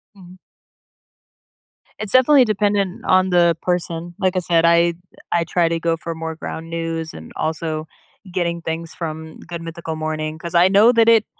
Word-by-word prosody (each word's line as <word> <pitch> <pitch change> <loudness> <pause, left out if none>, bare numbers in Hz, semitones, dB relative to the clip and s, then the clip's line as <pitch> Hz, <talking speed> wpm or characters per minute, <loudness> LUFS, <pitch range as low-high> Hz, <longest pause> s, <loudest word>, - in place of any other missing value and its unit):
Mhm. 185 -1 -15 1.6
It's 215 -2 -4
definitely 260 +1 +6
dependent 205 -3 0
on 185 0 +3
the 170 -2 +3
person. 175 -1 -3
Like, 185 -1 +1
I - - +2
said, 170 -2 +2
I 170 0 +4 0.4
I 170 - +2
try 170 +1 +1
to 165 0 -1
go 165 0 0
for 165 0 -6
more 160 0 -5
Ground 165 +1 -7
News, 165 -1 -4
and 80 0 -11
also, 155 0 -3 0.4
getting 170 -1 -2
things 165 0 -5
from 160 -1 -6
Good 170 -1 -7
Mythical 165 -1 -6
Morning 155 0 -3
'cause 170 +1 -7
I 175 +2 +6
know 205 +5 +6
that 230 -1 +5
it 225 -2 +5
170 Hz, 170 wpm, -20 LUFS, 165-185 Hz, 1.6 s, definitely